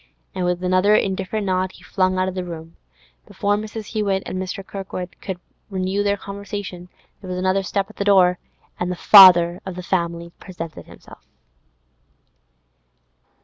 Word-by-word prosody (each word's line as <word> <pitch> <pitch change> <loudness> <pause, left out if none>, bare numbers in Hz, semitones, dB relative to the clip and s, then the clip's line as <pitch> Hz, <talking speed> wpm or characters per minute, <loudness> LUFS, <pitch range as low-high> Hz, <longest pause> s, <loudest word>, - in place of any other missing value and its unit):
And, 185 -1 -2
with 180 0 -1
another 185 +3 +3
indifferent 195 +1 -1
nod, 185 0 -1
he - - -17
flung 185 0 0
out 185 0 +1
of 190 - -3
the 185 -1 -3
room. 165 -2 -9 0.5
Before 205 0 0
Mrs. 215 +1 -6
Hewett 200 -3 0
and 185 0 -4
Kirkwood 185 -2 -7
could 190 -2 -5 0.3
renew 190 +1 -1
their 205 0 +1
conversation, 200 -3 -7 0.3
there 190 - -9
was 180 - -3
another 185 +1 +1
step 195 +1 -2
at 215 - -17
the - - -1
door, 185 -3 +4 0.4
and 180 0 -1
the - - -2
father 180 -3 +8
of 190 -2 -7
the 180 - -7
family 170 -2 -2
presented 165 -4 -8
himself. - - -15
185 Hz, 155 wpm, -21 LUFS, 180-200 Hz, 0.5 s, father